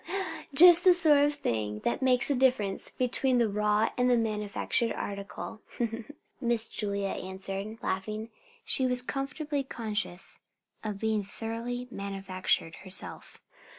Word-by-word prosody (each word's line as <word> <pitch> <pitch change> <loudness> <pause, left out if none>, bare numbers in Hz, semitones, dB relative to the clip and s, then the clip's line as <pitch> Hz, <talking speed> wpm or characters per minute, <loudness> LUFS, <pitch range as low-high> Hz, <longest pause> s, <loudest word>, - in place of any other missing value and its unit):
Just 350 +3 +9
the 370 - +8
sort 310 -5 +6
of 295 0 0
thing 105 - -2
that 120 - -1
makes 255 0 +4
the - - +3
difference 250 -7 +1
between 255 +1 0
the 235 -2 +3
raw 210 +1 +1
and 250 0 +3
the 245 - +4
manufactured 215 +1 -1
article," 200 +2 -6 0.8
Miss 235 -2 +2
Julia 200 -2 -3
answered, 195 +4 -5
laughing. 215 +4 -3 0.3
She 260 -2 +1
was 250 0 0
comfortably 280 +3 -3
conscious 210 -8 -5 0.4
of 210 -2 -4
being 220 0 0
thoroughly 230 +4 -5
"manufactured" 195 -4 -2
herself. 190 -1 -7
220 Hz, 125 wpm, -29 LUFS, 200-250 Hz, 0.8 s, Just